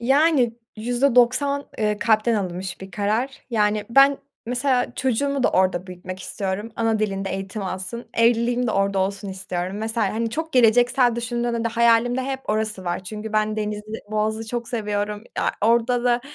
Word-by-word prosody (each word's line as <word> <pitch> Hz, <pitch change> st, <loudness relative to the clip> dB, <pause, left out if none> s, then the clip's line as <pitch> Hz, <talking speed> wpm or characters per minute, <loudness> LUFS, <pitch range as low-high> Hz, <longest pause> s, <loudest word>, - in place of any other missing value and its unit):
Yani, 270 Hz, -1 st, +3 dB, 0.2 s
%90 250 Hz, +4 st, +2 dB
eee, 210 Hz, -1 st, 0 dB
kalpten 225 Hz, +1 st, +2 dB
alınmış 185 Hz, -2 st, -3 dB
bir 190 Hz, -, -9 dB
karar. 215 Hz, +8 st, -1 dB
Yani, 210 Hz, -2 st, +1 dB
ben 275 Hz, +3 st, +6 dB, 0.3 s
mesela 250 Hz, 0 st, 0 dB
çocuğumu 270 Hz, +2 st, 0 dB
da -, -, +3 dB
orada 185 Hz, -1 st, +1 dB
büyütmek 185 Hz, +1 st, -8 dB
istiyorum. 200 Hz, +4 st, -4 dB
Ana 225 Hz, -1 st, +1 dB
dilinde 195 Hz, -2 st, -2 dB
eğitim 195 Hz, +2 st, -4 dB
alsın. 190 Hz, +5 st, -5 dB
Evliliğim 240 Hz, +1 st, +2 dB
de -, -, 0 dB
orada 195 Hz, -1 st, +1 dB
olsun 195 Hz, +1 st, -2 dB
istiyorum. 185 Hz, 0 st, -4 dB
Mesela, 220 Hz, -1 st, -1 dB
hani, 230 Hz, 0 st, -1 dB
çok 320 Hz, +5 st, -4 dB
geleceksel 245 Hz, 0 st, +4 dB
düşündüğünde 235 Hz, 0 st, -2 dB
de 230 Hz, -, +2 dB
hayalimde 235 Hz, +2 st, +3 dB
hep 265 Hz, 0 st, -3 dB
orası 215 Hz, -3 st, -2 dB
var 175 Hz, +2 st, -3 dB
çünkü 215 Hz, +2 st, -6 dB
ben 215 Hz, 0 st, +1 dB
denizi, 210 Hz, -1 st, -3 dB, 0.3 s
boğazı 215 Hz, +1 st, -1 dB
çok 240 Hz, -1 st, -4 dB
seviyorum. 210 Hz, -1 st, -2 dB
Ya, -, -, +1 dB
orada 235 Hz, +2 st, +2 dB
da, 240 Hz, 0 st, +3 dB
225 Hz, 160 wpm, -23 LUFS, 205-245 Hz, 0.3 s, ben